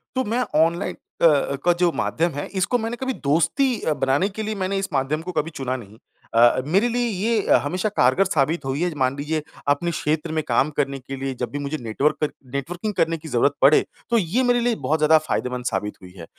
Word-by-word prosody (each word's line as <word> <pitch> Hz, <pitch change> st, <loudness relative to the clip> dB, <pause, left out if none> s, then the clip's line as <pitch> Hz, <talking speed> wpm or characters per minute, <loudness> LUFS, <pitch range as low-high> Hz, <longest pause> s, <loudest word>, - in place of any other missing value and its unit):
तो 260 Hz, -, +1 dB
मैं 240 Hz, +3 st, 0 dB, 0.2 s
ऑनलाइन 170 Hz, +4 st, -2 dB, 0.3 s
अ -, -, +5 dB
अ, 145 Hz, -3 st, +3 dB
का 175 Hz, -, +6 dB
जो 175 Hz, 0 st, +2 dB
माध्यम 170 Hz, +1 st, 0 dB
है 145 Hz, +1 st, -4 dB
इसको 190 Hz, +6 st, +1 dB
मैंने 230 Hz, +1 st, -3 dB
कभी 260 Hz, +1 st, -2 dB
दोस्ती 170 Hz, -, +1 dB
अ, 155 Hz, -, +1 dB
बनाने 140 Hz, +7 st, +1 dB
के 215 Hz, +2 st, -5 dB
लिए 215 Hz, 0 st, -3 dB
मैंने 190 Hz, 0 st, -1 dB
इस 195 Hz, 0 st, -2 dB
माध्यम 140 Hz, +3 st, 0 dB
को 180 Hz, +2 st, -6 dB
कभी 155 Hz, -1 st, -1 dB
चुना 130 Hz, -1 st, -2 dB
नहीं। 110 Hz, -3 st, -10 dB, 0.4 s
अ, 120 Hz, +2 st, +5 dB
मेरे 195 Hz, +10 st, +2 dB
लिए 240 Hz, 0 st, 0 dB
ये 215 Hz, +1 st, +1 dB
हमेशा 175 Hz, -, -1 dB
कारगर 160 Hz, -1 st, +3 dB
साबित 160 Hz, -3 st, 0 dB
हुई 135 Hz, +4 st, -2 dB
है 175 Hz, -2 st, 0 dB
मान 130 Hz, 0 st, +1 dB
लीजिए 155 Hz, +2 st, -2 dB, 0.3 s
अपने 170 Hz, +4 st, +1 dB
क्षेत्र 155 Hz, 0 st, -1 dB
में 155 Hz, -1 st, -1 dB
काम 130 Hz, +4 st, +2 dB
करने 140 Hz, -2 st, 0 dB
के 135 Hz, +2 st, -7 dB
लिए 135 Hz, 0 st, -3 dB
जब 125 Hz, -, -2 dB
भी 145 Hz, -, -4 dB
मुझे 145 Hz, +2 st, -3 dB
नेटवर्कर 140 Hz, +6 st, 0 dB, 0.2 s
नेटवर्किंग 175 Hz, +9 st, -3 dB
करने 165 Hz, -1 st, +1 dB
की 160 Hz, 0 st, -11 dB
ज़रूरत 140 Hz, 0 st, +2 dB
पड़े, 140 Hz, +3 st, +6 dB, 0.2 s
तो 235 Hz, -, +3 dB
ये 220 Hz, +6 st, +1 dB
मेरे 245 Hz, -1 st, +3 dB
लिए 240 Hz, -1 st, +1 dB
बहुत 155 Hz, +1 st, +2 dB
ज़्यादा 155 Hz, +1 st, +6 dB
फ़ायदेमंद 125 Hz, -1 st, -2 dB
साबित 105 Hz, -2 st, -2 dB
हुई 90 Hz, -1 st, -12 dB
है 85 Hz, -, -8 dB
155 Hz, 225 wpm, -23 LUFS, 135-195 Hz, 0.4 s, का